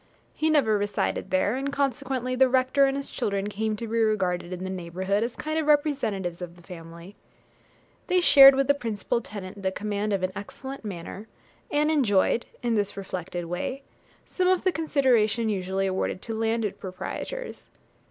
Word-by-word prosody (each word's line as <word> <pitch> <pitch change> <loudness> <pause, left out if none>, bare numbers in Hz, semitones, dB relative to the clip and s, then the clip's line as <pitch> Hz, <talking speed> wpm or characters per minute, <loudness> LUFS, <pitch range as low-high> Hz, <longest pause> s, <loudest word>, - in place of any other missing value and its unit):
He 315 - 0
never 245 -9 +3
resided 205 0 -1
there, 190 +4 +1
and 275 +1 -2
consequently 270 -2 -1
the 260 0 +4
rector 260 +2 +3
and 270 0 -1
his 280 - -4
children 200 -4 -2
came 215 +1 -1
to 230 - -5
be 230 +1 -1
regarded 185 -5 0
in 180 0 -5
the 190 - -4
neighbourhood 185 +3 -2
as 235 +1 -3
a - - -24
kind 310 +1 -2
of 310 - -2
representatives 235 - +1
of 175 -1 -7
the 175 - -18
family. 170 +2 -11 0.9
They 365 - +3
shared 275 -5 +9
with 275 0 +2
the 285 - +5
principal 235 -3 -2
tenant 200 -3 -8
the 190 -1 0
command 210 +1 -2
of 195 -2 0
an 185 - 0
excellent 265 +7 -8
manor, 195 +1 -7 0.4
and 300 +1 +2
enjoyed, 235 -6 +2 0.2
in 240 -1 +1
this 205 -2 -1
reflected 180 -2 -5
way, 180 +11 -4 0.4
some 365 -1 -1
of 370 -1 +3
the 370 - +3
consideration 245 -9 +2
usually 190 -1 -1
awarded 190 -1 -2
to 225 - -3
landed 225 -1 -1
proprietors. 475 - -6
215 Hz, 175 wpm, -26 LUFS, 190-270 Hz, 0.9 s, shared